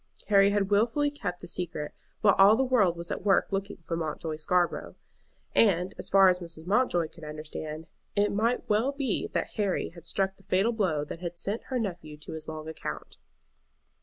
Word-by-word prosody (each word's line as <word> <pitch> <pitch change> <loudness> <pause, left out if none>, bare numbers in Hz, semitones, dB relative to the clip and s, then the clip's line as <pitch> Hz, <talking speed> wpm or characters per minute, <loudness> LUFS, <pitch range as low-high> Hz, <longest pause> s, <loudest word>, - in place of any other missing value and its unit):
Harry 200 -1 +6
had 200 -1 0
wilfully 235 +8 +2
kept 200 -11 -5
the 175 - -8
secret 165 -4 -3 0.3
while 205 -2 +6
all 200 +3 +8
the 265 - +2
world 215 -10 +3
was 170 0 -5
at - - -3
work 195 -2 +3
looking 195 +1 -3
for 165 - -1
Mountjoy 160 -1 -3
Scarborough; 175 +3 0 0.6
and, 185 -4 +3
as - - -2
far 195 0 +7
as 180 -1 +4
Mrs. 165 -2 -6
Mountjoy 185 -5 +2
could 165 - -15
understand, 155 +1 -6 0.3
it 205 0 +2
might 230 +4 0
well 220 +6 +2
be 280 -2 -1
that - - 0
Harry 200 -3 0
had 170 0 -11
struck 195 +2 0
the 195 - -21
fatal 195 +5 +2
blow 180 -10 0
that 165 - -7
had 175 -1 -5
sent 205 +6 -3
her 260 - -2
nephew 175 -9 -4
to 150 - -8
his 160 -1 -7
long 155 0 -6
account. 160 - -6
185 Hz, 195 wpm, -28 LUFS, 165-210 Hz, 0.6 s, all